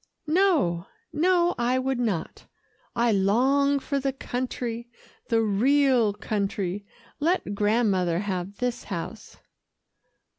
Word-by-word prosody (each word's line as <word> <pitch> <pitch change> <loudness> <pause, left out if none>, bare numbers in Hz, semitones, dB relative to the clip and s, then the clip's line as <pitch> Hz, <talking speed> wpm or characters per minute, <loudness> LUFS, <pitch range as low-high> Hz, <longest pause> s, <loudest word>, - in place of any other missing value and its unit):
"No, 305 - +2 0.3
no, 350 +2 +3
I 245 +2 +2
would 260 -1 -1
not. 210 -9 -3 0.5
I 235 0 +3
long 260 +8 +3
for 280 0 -2
the 270 0 0
country 245 -2 -4 0.4
the 225 -1 +3
real 245 +2 +3
country 200 -2 -3 0.3
let 315 - 0
Grandmother 200 -5 +2
have 195 -1 -4
this 250 -1 -2
house." 195 +4 -6
235 Hz, 105 wpm, -26 LUFS, 200-275 Hz, 0.5 s, no